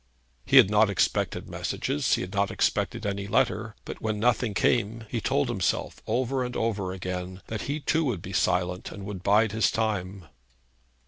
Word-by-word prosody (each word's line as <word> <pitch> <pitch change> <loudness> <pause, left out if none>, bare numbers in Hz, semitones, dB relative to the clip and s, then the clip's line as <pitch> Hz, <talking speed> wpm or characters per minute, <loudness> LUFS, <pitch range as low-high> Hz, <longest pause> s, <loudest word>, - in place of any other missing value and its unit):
He - - +5
had 95 - +8
not 105 0 +5
expected 100 - 0
messages. 75 - -1
He - - -3
had 95 +1 -6
not 100 0 +1
expected - - 0
any 100 0 -2
letter. 110 +2 0
But - - -7
when 110 -1 -1
nothing 115 -2 +1
came, 115 +1 +1
he - - -1
told - - +1
himself - - -1
over 130 +1 0
and 125 0 -5
over 105 -5 -1
again 90 0 -5
that 110 -1 -3
he 145 +2 -1
too 160 +2 +1
would 110 -11 -2
be 95 - -7
silent, 90 0 0
and 100 -1 -8
would 100 -3 -6
bide 105 +3 +3
his 110 +1 +2
time. 100 -4 -2
105 Hz, 180 wpm, -27 LUFS, 95-110 Hz, -, had